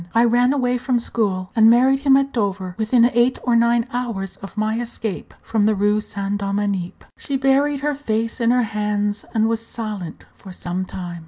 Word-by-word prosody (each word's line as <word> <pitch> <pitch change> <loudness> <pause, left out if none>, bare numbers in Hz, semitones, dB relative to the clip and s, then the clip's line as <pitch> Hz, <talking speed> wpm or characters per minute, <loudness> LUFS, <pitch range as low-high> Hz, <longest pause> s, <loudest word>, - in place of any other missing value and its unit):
I 230 - +5
ran 245 +2 +3
away 250 -3 0
from 250 0 0
school, 195 -6 -2
and 220 -1 +6
married 260 +3 +4
him 275 -1 +4
at 275 0 -1
Dover, 195 -5 -2
within 230 +3 +3
eight 240 +2 +3
or 240 -1 +2
nine 235 0 +3
hours 230 -6 -3
of 195 +2 -11
my 215 +2 0
escape 230 -4 -5
from 215 -2 +1
the 215 - +2
Rue 205 +1 +2
Saint 200 -1 -4
Dominique." 200 -2 -2 0.2
She 275 - -2
buried 270 +1 +2
her 295 +1 0
face 230 -4 -2
in 230 - +3
her 250 0 +3
hands, 210 -1 -2
and 220 0 +3
was 225 0 -1
silent 210 -8 -6
for 190 - -13
some 180 +1 -4
time. 175 -2 -7
225 Hz, 190 wpm, -21 LUFS, 205-245 Hz, 0.2 s, and